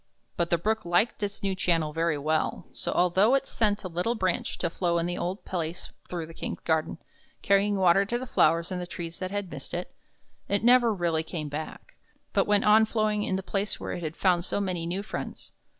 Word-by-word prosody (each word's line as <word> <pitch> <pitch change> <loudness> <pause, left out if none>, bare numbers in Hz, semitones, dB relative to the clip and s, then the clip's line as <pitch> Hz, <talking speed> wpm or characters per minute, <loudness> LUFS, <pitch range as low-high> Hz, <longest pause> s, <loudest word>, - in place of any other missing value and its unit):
But 170 -1 0
the 170 - +3
Brook 220 +6 0
liked 175 +7 +1
its 200 -1 -3
new 195 -1 +1
channel 165 -5 0
very 165 -1 +1
well' 155 +2 -1
so, - - -3
although 190 +8 +4
it 275 0 +1
sent 210 -2 0
a - - -3
little 180 +7 -1
branch 185 -5 -1
to - - -1
flow 170 -1 0
in 170 - 0
the 175 0 -2
old 185 +4 -3
place 170 -2 -4 0.2
through 170 -2 -3
the 165 - -12
King's - - -5
garden, 160 0 0 0.5
carrying 200 +1 +3
water 190 0 +5
to 240 +4 -1
the 255 - -5
flowers 165 -6 +2
and 180 -1 -4
trees 170 -1 -6
that 185 0 -3
had 200 -2 -4
missed - - -7
it, - - -5 0.6
it 200 +1 +1
never 240 -1 +6
really 170 -5 0
came 160 -2 -5
back, 150 +2 -7 0.4
but 195 - +2
went 205 -1 +3
on 215 +1 +6
flowing 215 -1 0
in 190 - 0
the 190 - -3
place 200 +2 -2
where - - -5
it - - -5
had 160 -1 -5
found 180 -3 +3
so 200 - -1
many 180 -4 -2
new 185 +4 -2
friends. - - -6
185 Hz, 215 wpm, -27 LUFS, 170-205 Hz, 0.6 s, never